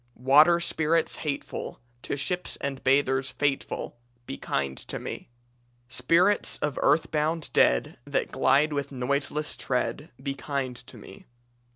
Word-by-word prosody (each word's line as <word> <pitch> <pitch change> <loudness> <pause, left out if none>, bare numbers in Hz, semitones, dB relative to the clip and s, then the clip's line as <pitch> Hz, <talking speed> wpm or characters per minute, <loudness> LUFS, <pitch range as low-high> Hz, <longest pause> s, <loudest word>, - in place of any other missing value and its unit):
"Water 150 +7 +5
spirits 165 -1 +1
hateful, 145 -3 -5 0.2
To 140 - -3
ships 180 +6 -1
and 140 -1 -5
bathers 130 -1 +2
fateful, 135 -4 -2 0.3
Be - - -5
kind 70 -1 -2
to - - -6
me. - - -7 0.6
"Spirits 170 +11 +2
of 150 -3 -2
earthbound 155 +1 +1
dead 60 - +3
That - - -1
glide 145 +3 +3
with 140 -1 -3
noiseless 140 +3 -1
tread, 130 +4 -2
Be 135 +1 -3
kind 135 -2 -3
to 125 0 -12
me. 100 -2 -13
140 Hz, 130 wpm, -27 LUFS, 130-155 Hz, 0.6 s, Water